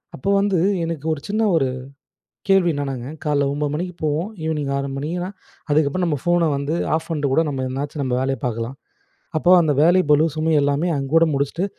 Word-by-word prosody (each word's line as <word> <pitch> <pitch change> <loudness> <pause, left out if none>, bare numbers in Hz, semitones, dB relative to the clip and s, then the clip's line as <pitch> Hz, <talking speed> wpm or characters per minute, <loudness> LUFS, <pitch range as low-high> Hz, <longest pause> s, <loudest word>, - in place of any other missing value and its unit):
அப்போ 135 - -3
வந்து 200 -2 +1 0.3
எனக்கு 165 -3 -4
ஒரு 155 - -5
சின்ன 215 +2 0
ஒரு 140 -5 +2 0.8
கேள்வி 195 -3 +4
என்னனாங்க, 135 -4 -4 0.2
காலையில 145 -2 +1
9:00 145 0 -2
மணிக்கு 180 +4 -3
போவோம். 155 +6 0 0.2
ஈவ்னிங் 150 -3 -1
6:00 140 0 -2
மணினா, 170 +6 -3 0.4
அதுக்கப்புறம் 150 +4 +2
நம்ம 155 -4 0
ஃபோன 175 -2 +2
வந்து 140 +2 -2 0.2
ஆஃப் 160 - -3
பண்ணிட்டு 145 -4 -1
கூட, 160 - +4
நம்ம 135 -2 -3
எதனாச்சும் 140 +3 -4
நம்ம 130 -2 -1
வேலைய 135 0 -1
பார்க்கலாம். 115 +1 -3 0.6
அப்போ 175 - +2
அந்த 155 -3 +2
வேலை 175 +3 +5
பளு, 150 +1 +5
சுமை 160 +1 +1
எல்லாமே 145 +5 +1
அங்கோட 150 +5 +3
முடிச்சுட்டு, 140 +6 -1
150 Hz, 180 wpm, -21 LUFS, 140-165 Hz, 0.8 s, வேலை